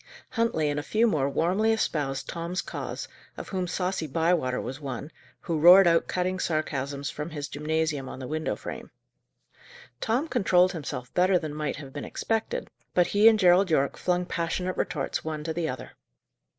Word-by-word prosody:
Huntley 230 -11 +1
and 145 0 0
a - - -2
few 220 +10 +2
more 145 -11 +1
warmly 190 +9 +2
espoused 145 -11 -1
Tom's 170 +2 -3
cause, - - -5 0.3
of - - -7
whom 185 -2 -2
saucy 180 -2 -2
Bywater 160 -3 +1
was 135 +3 -6
one, 140 +2 -5 0.3
who 165 -2 -2
roared 180 +4 +9
out 165 -1 +3
cutting 185 +1 -1
sarcasms 140 -3 -2
from 150 +2 -5
his 145 -3 -5
gymnasium 150 -2 -2
on - - -7
the 130 -1 -6
window 155 +2 -2
frame. - - -8 1.1
Tom 245 +8 0
controlled 185 - +3
himself 140 -6 -6
better 185 +1 +4
than 155 -4 -4
might 150 -1 -2
have 135 -2 -10
been 145 - -5
expected, 225 -1 -2 0.3
but 180 - +5
he 205 +4 +4
and 225 -1 +7
Gerald 185 -1 +5
Yorke 140 -4 +2
flung 180 0 0
passionate 180 +1 -2
retorts 140 -4 -2
one 155 -1 -4
to 160 +1 -3
the 165 -1 -1
other. 130 - -6
165 Hz, 175 wpm, -27 LUFS, 145-185 Hz, 1.1 s, roared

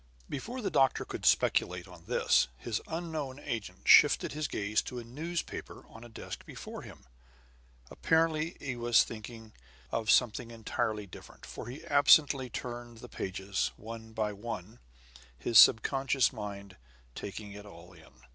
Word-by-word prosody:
Before 240 - -5
the - - -1
doctor 135 -1 +3
could - - -3
speculate 90 0 +2
on 90 -2 -14
this, - - +3
his 110 - -3
unknown 160 -5 -4
agent 115 -7 -6
shifted - - +7
his 150 +1 -2
gaze 105 +1 0
to 125 - -7
a 120 - -5
newspaper 160 +9 -5
on 115 - -12
a 120 - -11
desk 110 - -8
before - - -9
him. - - -13 0.9
Apparently 160 0 +1
he 130 -3 -4
was 120 -1 +4
thinking 115 0 -9 0.4
of 110 -2 -2
something 120 -1 +3
entirely 110 -2 -3
different; 95 - -13
for - - -8
he 130 +5 -8
absently 145 -2 +5
turned 120 -1 -6
the 120 +1 -11
pages, 95 +1 -3
one 110 +1 -9
by 110 -1 -2
one, 105 0 -7 0.6
his 110 - +5
subconscious 135 +3 +5
mind 100 -4 -7 0.4
taking 100 - -7
it 105 +1 -10
all 90 -1 -13
in. 65 -7 -19
115 Hz, 145 wpm, -31 LUFS, 105-135 Hz, 0.9 s, shifted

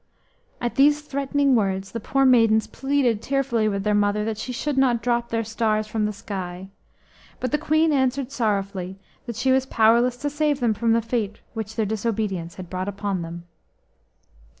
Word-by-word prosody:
At 240 0 -2
these 290 +2 +5
threatening 280 -1 +1
words 195 -4 0
the 230 - -4
poor 270 +5 +1
maidens 225 -4 +5
pleaded 270 -6 0
tearfully 255 -5 0
with 200 -2 -1
their 210 0 +1
mother 205 0 +1
that 220 -1 -3
she 250 - -4
should 280 +4 -2
not 255 -3 +2
drop 235 -1 0
their 230 0 -1
stars 215 -1 0
from 215 0 -1
the - - -2
sky; 190 -3 -6 0.6
1 - - -30
but 255 - -2
the 300 - +1
Queen 315 +1 +2
answered 265 -1 0
sorrowfully 195 -6 -2 0.3
that 235 - -4
she 260 +4 +1
was 265 0 +2
powerless 235 +2 +3
to 290 +4 -2
save 295 -1 0
them 235 -4 +2
from 230 +2 +1
the 230 0 +2
fate 220 -3 -2 0.2
which 220 -1 -5
their 220 - 0
disobedience 205 -5 -2
had 185 -2 -8
brought 185 +2 -4
upon 200 -2 -3
them. 170 +1 -7
225 Hz, 185 wpm, -24 LUFS, 205-265 Hz, 0.6 s, these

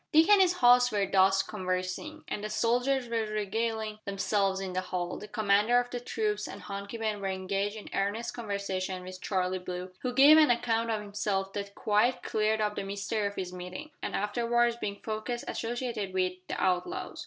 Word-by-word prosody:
Dick 320 +2 +6
and 410 -2 +7
his 360 -2 +4
host 245 -5 +5
were 205 -2 +1
thus 190 0 +4
conversing, 185 +11 -4
and 205 - -4
the 215 - -3
soldiers 245 +3 +1
were 230 -2 -1
regaling 215 +1 -2
themselves 195 -1 0
in 190 -1 -4
the 185 - 0
hall, 180 -1 -3
the 210 - -9
commander 210 +2 +3
of 245 0 -3
the 245 - -3
troops 215 -3 -2
and - - -9
Hunky 200 +2 -6
Ben 215 -2 -2
were 195 - -2
engaged 195 +2 -2
in 215 - -9
earnest 205 +4 -1
conversation 195 -4 -3
with 185 0 -9
Charlie 185 -1 -1
Brooke, 180 0 -6
who 250 - -1
gave 280 +5 +8
an 305 - +6
account 230 -1 +1
of 220 -2 0
himself 200 -2 -2
that 200 0 -5
quite 215 +4 +2
cleared 215 0 +1
up 210 0 0
the - - -3
mystery 200 +2 -2
of 200 - -6
his 185 -1 -4
meeting, 180 +13 -7
and - - -3
afterwards 235 +3 +1
being 200 -4 -4
found 215 +1 -4
associated 235 -4 -3
with, 185 -1 +1
the - - -4
outlaws. 185 - -1
210 Hz, 190 wpm, -29 LUFS, 195-235 Hz, -, gave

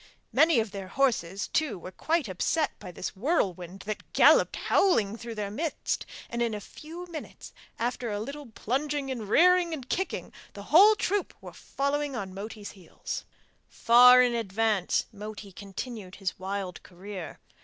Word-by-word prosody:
Many 315 -5 +5
of 220 -2 -2
their 195 -2 -6
horses 200 -7 0
too 295 -11 0
were 180 +1 -9
quite 315 - 0
upset 255 - 0
by 185 -3 -9
this 180 - -6
whirlwind 190 - -1
that 215 +1 -6
galloped - - +5
howling 220 - +2
through 230 0 -7
their 205 -2 -3
midst, 310 +8 -3 0.2
and 235 0 -4
in 230 -2 0
a - - -4
few 325 - -10
minutes, 335 -3 -9 0.2
after 240 0 -2
a 205 -1 -2
little 280 +5 -6
plunging 270 +5 -2
and 225 -6 -5
rearing 350 +4 +4
and 270 -4 -10
kicking, 380 +7 -3 0.2
the 200 - -9
whole 410 +6 +8
troop 405 -1 -1
were - - -11
following 280 0 -2
on 195 -5 -5
Moti's 205 +1 -7
heels. 185 -5 -7 0.4
Far 250 +2 +7
in 245 -1 +2
advance, 220 -3 0
Moti 210 -1 -8
continued 200 +1 -7
his 190 -2 -4
wild 190 -1 -4
career. 185 -1 -9
225 Hz, 155 wpm, -28 LUFS, 195-290 Hz, 0.4 s, whole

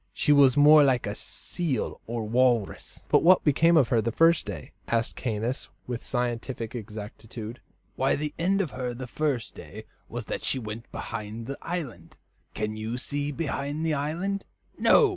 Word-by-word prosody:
She 150 - +2
was 140 -2 +6
more 150 +1 +8
like 130 -3 +2
a 100 - -2
seal 145 - -3
or 115 0 -2
walrus." 120 -2 +1
"But - - +5
what 185 +2 +6
became 165 +3 +4
of 135 -6 +4
her 120 -4 +3
the 115 +2 -1
first 165 +3 +4
day?" - - -6 0.2
asked 115 -1 0
Caius, 115 +1 -2 0.2
with 120 -2 -4
scientific 120 -1 -2
exactitude. 110 +1 -7 0.3
"Why, 135 - +2
the 150 +1 -3
end 195 +4 +2
of 170 -8 -3
her 125 -2 -4
the 130 +2 -6
first 135 -2 -2
day - - -10 0.3
was - - -5
that - - -4
she - - 0
went 115 -1 -7
behind 110 0 -5
the 140 +3 -6
island. 165 -8 -5 0.4
Can 110 0 -2
you 110 +3 -3
see 145 +2 -2
behind 145 0 -2
the 160 - +1
island? 170 +8 -2 0.3
No." 445 -4 +5
130 Hz, 170 wpm, -27 LUFS, 115-150 Hz, 0.4 s, more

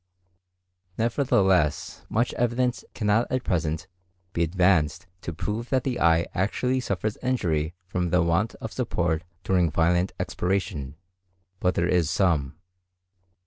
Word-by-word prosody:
Nevertheless 105 - +1
much 115 +3 +1
evidence 120 +1 0
cannot 110 +1 +1
at 130 -1 0
present 80 -2 -1 0.5
be 85 - -1
advanced 85 -2 +2 0.2
to - - -4
prove 105 +8 -4
that 130 -2 +1
the 130 -2 -2
eye 85 0 +4
actually 125 +7 0
suffers 105 -3 -2
injury 85 -11 -1
from 90 -1 -1
the 90 0 +3
want 85 +6 +1
of - - -7
support 80 +1 -1 0.2
during 90 -3 +2
violent 85 +4 +2
expiration; 90 -7 -2 0.6
but 90 -1 +1
there 85 - +1
is 85 -3 +2
some. 80 -7 +1
90 Hz, 125 wpm, -26 LUFS, 85-110 Hz, 0.6 s, eye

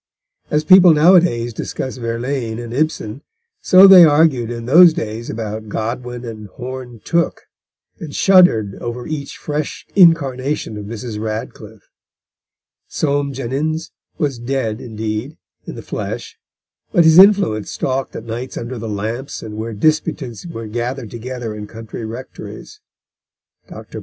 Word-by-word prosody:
As 150 +1 +1
people 185 0 +7
nowadays 150 -8 +4
discuss 130 +4 -5
Verlaine 115 0 -3
and 120 -1 -7
Ibsen, 140 -4 -2 0.4
so 185 +1 +7
they 190 -2 +10
argued 145 -6 +3
in 120 -1 -6
those 165 +5 +7
days 110 +2 -5
about 110 0 -5
Godwin 120 +3 -4
and 110 -2 -8
Horne 125 +1 -8
Tooke, 170 0 0 0.6
and 155 - -7
shuddered 175 - +4
over 120 +1 -5
each 150 -3 -6
fresh 150 0 -4
incarnation 145 - +2
of 105 -1 -7
Mrs. 110 0 -6
Radcliffe. 110 0 -7 1.0
Soame 145 -1 -1
Jenyns 140 +5 -3 0.3
was 140 -7 -2
dead, 120 -2 -3
indeed, 110 +5 -5 0.3
in - - -7
the - - -9
flesh, - - -6 0.5
but 175 -5 +4
his 160 +2 +7
influence 190 - +5
stalked 130 0 -3
at - - -6
nights 120 +3 -6
under 120 +1 -5
the 115 0 -5
lamps 110 +6 -5
and 105 -1 -8
where 110 +1 -5
disputants 155 0 -1
were 115 -9 -7
gathered 120 +2 -4
together 120 -1 -6
in 105 0 -8
country 110 +1 -8
rectories. 120 +4 -9 0.9
Dr. - - -9
125 Hz, 135 wpm, -18 LUFS, 115-150 Hz, 1.0 s, they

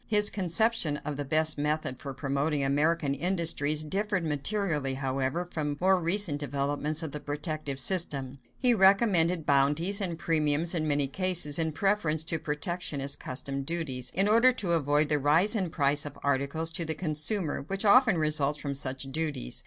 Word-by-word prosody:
His 210 -1 +4
conception 185 -3 +1
of 150 - -3
the 145 - -4
best 155 +1 +1
method 150 -3 -2
for 140 - -7
promoting 140 +2 -1
American 145 +1 +1
industries 155 -2 +1
differed 190 +2 -2
materially, 150 -2 -1
however, 135 +5 -2
from 150 -4 -4
more 190 +1 +3
recent 170 -3 +3
developments 145 +2 -2
of 160 - -5
the 150 - -6
protective 145 -1 -4
system. 140 -5 0 0.2
He 250 -1 +3
recommended 190 -5 +3
bounties 150 +9 +1
and 175 -4 -2
premiums 160 0 0
in 155 -3 -2
many 145 -2 +1
cases 170 -1 0
in 160 -1 0
preference 165 -3 0
to 160 0 -2
protectionist 150 -2 -3
customs 135 +1 -4
duties, 155 -7 -2
in 195 +3 +5
order 230 +4 +5
to 200 -8 -2
avoid 150 -2 +1
the 150 0 0
rise 165 - +3
in 195 -4 0
the - - -6
price 145 -2 +1
of 145 -1 -9
articles 140 +4 -1
to 170 - -1
the 160 -1 -3
consumer 155 +2 -1
which 195 +3 -3
often 220 -2 +5
results 150 -2 0
from 140 -1 -5
such 135 -1 -2
duties. 150 - -3
155 Hz, 170 wpm, -28 LUFS, 145-180 Hz, 0.2 s, in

